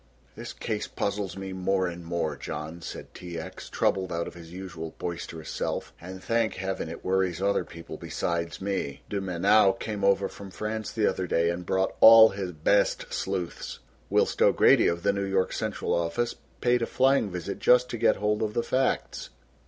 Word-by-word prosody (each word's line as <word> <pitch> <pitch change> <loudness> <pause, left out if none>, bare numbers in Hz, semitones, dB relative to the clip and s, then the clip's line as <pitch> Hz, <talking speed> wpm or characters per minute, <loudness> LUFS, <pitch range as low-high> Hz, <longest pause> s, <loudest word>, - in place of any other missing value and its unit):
"This - - -7
case 105 -1 -3
puzzles 100 -2 -3
me 95 0 -5
more 95 0 0
and 85 0 -6
more, 85 -3 -2
John," 80 +4 -6
said - - -8
T. 85 -2 -7
X., 80 - -8
troubled 95 -1 0
out 85 0 -2
of - - -8
his 85 -1 -12
usual 90 -3 -7
boisterous 85 -2 -5
self, - - -3
"and 95 +2 -9
thank 115 -1 +1
heaven 95 -3 -3
it 85 - -9
worries 95 -2 +1
other 100 +1 +1
people 85 0 -10
besides 85 0 -3
me. 95 -8 -3
De 100 -1 -1
Mainau 95 +2 +4
came 105 -3 -5
over 100 0 +3
from 100 0 -10
France 110 +2 -4
the 110 -2 0
other 90 - -1
day 85 0 +2
and 85 0 -6
brought 95 0 +1
all 110 0 +10
his 95 -2 -4
best 90 +6 +1
sleuths, 90 -2 -3 0.3
whilst - - +1
O'Grady - - +5
of 85 0 -1
the 100 - +3
New 100 - -2
York 95 -1 0
central - - -2
office 85 +8 0 0.3
paid 120 0 +3
a 115 - 0
flying 130 -4 +3
visit 90 +2 -5
just 125 0 +5
to 120 - -4
get 115 - +4
hold 105 +1 0
of 105 -1 -2
the 120 - +1
facts. 130 0 -1
95 Hz, 185 wpm, -27 LUFS, 85-105 Hz, 0.3 s, all